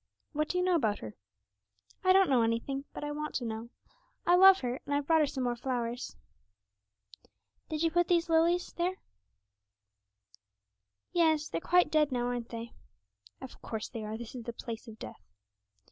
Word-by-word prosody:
'What 305 Hz, 0 st, -1 dB
do 360 Hz, -, -1 dB
you 360 Hz, -, +2 dB
know 365 Hz, 0 st, +2 dB
about 225 Hz, -11 st, +2 dB
her?' 110 Hz, -1 st, -8 dB, 0.9 s
'I 370 Hz, 0 st, +6 dB
don't 385 Hz, -3 st, +5 dB
know 250 Hz, -3 st, +5 dB
anything, 230 Hz, +5 st, -1 dB
but -, -, -7 dB
I 295 Hz, -, -3 dB
want 300 Hz, +1 st, -4 dB
to 245 Hz, -, -1 dB
know. 225 Hz, +1 st, -5 dB, 0.6 s
I 350 Hz, -, +4 dB
love 385 Hz, +1 st, +8 dB
her, 250 Hz, 0 st, -2 dB
and 285 Hz, -, -2 dB
I've 285 Hz, 0 st, 0 dB
brought 320 Hz, +1 st, +4 dB
her 300 Hz, -, +3 dB
some 265 Hz, -2 st, -3 dB
more 245 Hz, -1 st, 0 dB
flowers.' 245 Hz, -1 st, -3 dB, 1.5 s
'Did 310 Hz, 0 st, -2 dB
you 330 Hz, -, +2 dB
put 350 Hz, +1 st, +2 dB
these 345 Hz, -1 st, +2 dB
lilies 335 Hz, +2 st, +2 dB
here?' 355 Hz, +2 st, 0 dB, 2.2 s
'Yes; 315 Hz, -3 st, +2 dB
they're 165 Hz, -, -3 dB
quite 360 Hz, 0 st, +3 dB
dead 300 Hz, -2 st, +3 dB
now, 245 Hz, -1 st, 0 dB
aren't 245 Hz, -1 st, -3 dB
they?' 230 Hz, 0 st, -7 dB, 0.7 s
'Of 260 Hz, -, -10 dB
course 220 Hz, -1 st, -5 dB
they 225 Hz, -, -6 dB
are; 215 Hz, +1 st, -4 dB
this 235 Hz, -1 st, -8 dB
is 245 Hz, -3 st, -8 dB
the 235 Hz, -, -5 dB
place 230 Hz, +1 st, -7 dB
of 220 Hz, -1 st, -10 dB
death.' -, -, -9 dB
275 Hz, 180 wpm, -31 LUFS, 235-330 Hz, 2.2 s, love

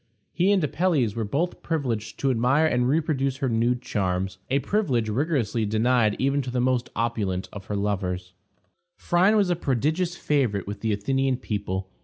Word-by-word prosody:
He 185 Hz, +3 st, +3 dB
and 195 Hz, -4 st, +3 dB
Apelles 150 Hz, -, +1 dB
were 115 Hz, -, -1 dB
both 150 Hz, -, -2 dB
privileged 125 Hz, -9 st, -2 dB
to 135 Hz, -, +2 dB
admire 130 Hz, +6 st, +3 dB
and 125 Hz, -5 st, +2 dB
reproduce 135 Hz, -3 st, 0 dB
her 135 Hz, -2 st, -1 dB
nude 120 Hz, +2 st, +1 dB
charms, 95 Hz, -2 st, -2 dB
a 135 Hz, -, +2 dB
privilege 135 Hz, -, 0 dB
rigorously 120 Hz, -3 st, 0 dB
denied 110 Hz, 0 st, +2 dB
even 140 Hz, +1 st, +1 dB
to 130 Hz, -, -5 dB
the 125 Hz, 0 st, -1 dB
most 125 Hz, -1 st, +1 dB
opulent 105 Hz, -5 st, -1 dB
of 100 Hz, -2 st, -8 dB
her 105 Hz, -, -3 dB
lovers. 95 Hz, -3 st, -2 dB, 0.6 s
Phryne 190 Hz, +5 st, +3 dB
was 195 Hz, -4 st, +2 dB
a -, -, +2 dB
prodigious 160 Hz, +5 st, 0 dB
favorite 125 Hz, -, 0 dB
with 100 Hz, +1 st, -6 dB
the 110 Hz, +1 st, -1 dB
Athenian 135 Hz, +5 st, 0 dB
people. 95 Hz, -5 st, -4 dB
125 Hz, 170 wpm, -25 LUFS, 105-145 Hz, 0.6 s, He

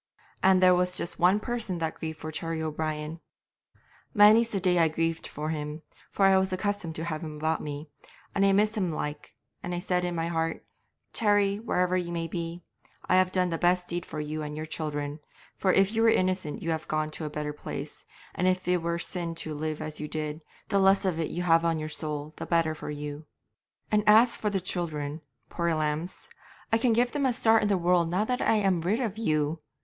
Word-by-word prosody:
And 185 Hz, -1 st, +5 dB
there 185 Hz, 0 st, +7 dB
was 180 Hz, 0 st, +1 dB
just 170 Hz, -, -3 dB
one 185 Hz, +4 st, +4 dB
person 230 Hz, -5 st, -3 dB
that 160 Hz, -1 st, -2 dB
grieved 160 Hz, -1 st, -6 dB
for 155 Hz, -, -5 dB
Terry 165 Hz, +1 st, -3 dB
O'Brien. 155 Hz, 0 st, -3 dB, 1.0 s
Many's 215 Hz, +2 st, +7 dB
the 200 Hz, -, -1 dB
day 180 Hz, -1 st, +2 dB
I 165 Hz, -, +5 dB
grieved 165 Hz, +1 st, -1 dB
for 150 Hz, +1 st, -5 dB
him, 150 Hz, 0 st, -4 dB, 0.3 s
for 195 Hz, -, +2 dB
I 190 Hz, 0 st, +6 dB
was 190 Hz, 0 st, 0 dB
accustomed 185 Hz, -3 st, -2 dB
to 160 Hz, -, -4 dB
have 155 Hz, -2 st, -3 dB
him 155 Hz, -1 st, -6 dB
about 160 Hz, +1 st, 0 dB
me, 145 Hz, +1 st, -6 dB, 0.5 s
and 195 Hz, -, +2 dB
I 195 Hz, -, +5 dB
missed 210 Hz, +3 st, +3 dB
him 185 Hz, -5 st, 0 dB
like, 150 Hz, -1 st, -5 dB, 0.3 s
and 175 Hz, 0 st, -3 dB
I -, -, -2 dB
said 180 Hz, 0 st, 0 dB
in 175 Hz, -1 st, -2 dB
my 165 Hz, 0 st, -1 dB
heart, 165 Hz, -1 st, -2 dB, 0.5 s
"Terry, 205 Hz, -2 st, +2 dB
wherever 180 Hz, -5 st, 0 dB
ye 180 Hz, -2 st, -1 dB
may 170 Hz, -1 st, -2 dB
be, 170 Hz, 0 st, -5 dB, 0.4 s
I 185 Hz, -, +4 dB
have 185 Hz, 0 st, +3 dB
done 180 Hz, -2 st, +1 dB
the 165 Hz, -, -2 dB
best 180 Hz, 0 st, +2 dB
deed 175 Hz, 0 st, -3 dB
for -, -, -7 dB
you 150 Hz, +1 st, -3 dB
and 150 Hz, 0 st, -5 dB
your 155 Hz, -, -4 dB
children, 150 Hz, -2 st, -3 dB, 0.4 s
for 190 Hz, -, +2 dB
if 195 Hz, +1 st, +4 dB
you 225 Hz, 0 st, 0 dB
were 230 Hz, -, +6 dB
innocent 185 Hz, -6 st, 0 dB
you 165 Hz, -, -1 dB
have 160 Hz, -1 st, -3 dB
gone 155 Hz, 0 st, -1 dB
to 155 Hz, -, -6 dB
a -, -, -3 dB
better 150 Hz, 0 st, -4 dB
place, 150 Hz, -, -7 dB, 0.3 s
and 180 Hz, -, 0 dB
if 185 Hz, -1 st, 0 dB
it 180 Hz, -1 st, +2 dB
were 170 Hz, 0 st, -1 dB
sin 170 Hz, -1 st, -3 dB
to 155 Hz, -1 st, -4 dB
live 155 Hz, +1 st, -3 dB
as 155 Hz, 0 st, -5 dB
you 150 Hz, -, -4 dB
did, 155 Hz, 0 st, -4 dB, 0.3 s
the 200 Hz, -2 st, +3 dB
less 195 Hz, +1 st, +4 dB
of 175 Hz, -4 st, 0 dB
it 160 Hz, -, -1 dB
you 175 Hz, -, -3 dB
have 165 Hz, -1 st, +4 dB
on 165 Hz, -1 st, +1 dB
your 155 Hz, 0 st, -4 dB
soul 150 Hz, 0 st, -4 dB
the -, -, -6 dB
better 165 Hz, -2 st, +2 dB
for 155 Hz, -, -7 dB
you; 150 Hz, +1 st, -6 dB, 0.6 s
and 210 Hz, -1 st, +3 dB
as 225 Hz, +3 st, +6 dB
for 210 Hz, -, -1 dB
the 200 Hz, -1 st, 0 dB
children, 155 Hz, -4 st, -2 dB, 0.3 s
poor 170 Hz, -1 st, -1 dB
lambs, 155 Hz, +3 st, -2 dB, 0.5 s
I 225 Hz, -, +5 dB
can 240 Hz, +1 st, +3 dB
give 240 Hz, +2 st, +2 dB
them 285 Hz, -2 st, +1 dB
a 250 Hz, -, +1 dB
start 225 Hz, -1 st, +4 dB
in 210 Hz, -, +1 dB
the 200 Hz, -2 st, +2 dB
world 175 Hz, -1 st, +2 dB
now 185 Hz, +5 st, +1 dB
I 250 Hz, -2 st, +2 dB
am 195 Hz, -5 st, +2 dB
rid 195 Hz, +8 st, 0 dB
of 220 Hz, -4 st, -2 dB
you!" 155 Hz, -5 st, 0 dB
170 Hz, 225 wpm, -28 LUFS, 155-190 Hz, 1.0 s, there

